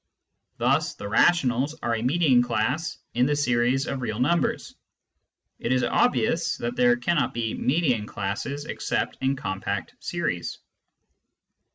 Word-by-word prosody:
Thus - - +1
the 100 - -7
rationals 135 +3 +2
are 120 - 0
a 110 - -1
median 135 -1 +3
class 125 +7 -1 0.2
in 125 +2 +2
the 145 - +1
series 125 -1 +1
of 135 -1 -3
real 110 -2 -3
numbers. 170 +7 0 0.9
It 120 - -2
is 130 -1 +2
obvious 240 - +1
that 240 - -3
there 245 -1 +4
cannot 170 - 0
be 115 -2 -1
median 130 -7 +1
classes 125 +10 -4
except - - -2
in 135 +1 +1
compact 95 -7 -4
series. - - -3
130 Hz, 135 wpm, -25 LUFS, 120-155 Hz, 0.9 s, there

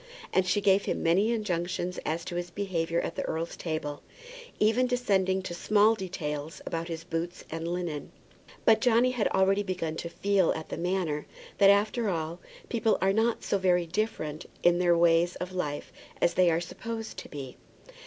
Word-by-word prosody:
And 185 -1 +3
she 205 +3 +2
gave 195 0 +4
him - - -2
many 190 +7 +3
injunctions 180 -4 -2
as 165 +2 -2
to 175 - -5
his 175 0 -3
behaviour 170 -3 -1
at - - -3
the - - -3
earl's 165 +1 -3
table, 155 -3 -4 0.6
even 225 +4 +3
descending 190 -7 +1
to 175 - -5
small 210 +4 +4
details 160 -7 -4
about 165 0 -3
his 165 -1 -5
boots 170 +1 -4
and 165 +1 -4
linen. 170 -4 -3 0.5
But 220 -1 +5
Johnny 245 +1 +4
had 245 -4 +1
already 195 +1 +3
begun 180 -5 -3
to 170 - -4
feel 195 0 +2
at 160 - -7
the - - -3
Manor 175 -4 -1 0.3
that, 200 -1 +7
after 210 +2 +3
all, 165 -1 -3 0.3
people 225 -2 +1
are 195 0 +2
not 225 +2 +1
so 200 - 0
very 180 -2 +3
different 165 -4 -3 0.2
in 175 0 +5
their 175 -1 +4
ways 170 +1 +4
of 180 +1 -5
life 150 -5 -3 0.3
as 170 - +3
they 180 -1 +4
are 165 0 +2
supposed 225 +5 -6
to - - -8
be. 135 -4 -7
180 Hz, 180 wpm, -28 LUFS, 165-205 Hz, 0.6 s, that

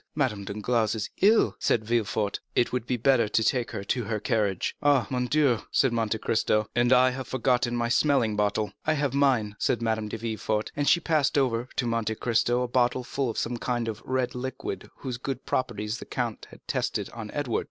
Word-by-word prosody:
"Madame 125 -9 0
Danglars 110 +2 0
is 110 -1 -4
ill," 215 +4 +4
said 110 -2 +1
Villefort; 110 -2 0 0.2
"it 120 - +2
would 125 -2 -2
be 125 - 0
better 120 -1 +3
to 110 +2 +1
take 125 +1 +1
her 105 -4 -5
to 120 +3 -1
her 110 -1 -2
carriage." 105 -5 0
"Oh, 145 -5 +4
mon 125 -1 0
Dieu!" 140 -5 +3
said 135 -3 +2
Monte 115 -1 0
Cristo, 110 -1 +1
"and 120 +1 +3
I 130 0 +6
have 130 0 -6
forgotten 125 -1 +1
my 120 0 0
smelling 120 -3 +2
bottle!" 105 +1 0
"I 155 - +2
have 145 -3 -1
mine," 130 -7 +2
said 120 - +1
Madame 110 -2 -1
de 110 - -5
Villefort; 110 -1 -2
and 145 -1 +1
she 170 - +5
passed 155 -3 +1
over 125 -2 +1
to 125 - 0
Monte 115 -2 -1
Cristo 120 +2 +1
a - - -2
bottle 125 +1 +1
full 130 +1 -2
of 115 - -4
the - - 0
same 120 +1 -2
kind 120 -1 -2
of 110 0 -4
red 130 -1 -1
liquid 130 +2 -5
whose 130 -3 -5
good 130 0 -4
properties 115 -3 -2
the - - -8
count - - -4
had - - -17
tested - - -2
on - - -7
Edward. - - -1
120 Hz, 210 wpm, -27 LUFS, 110-130 Hz, 0.2 s, I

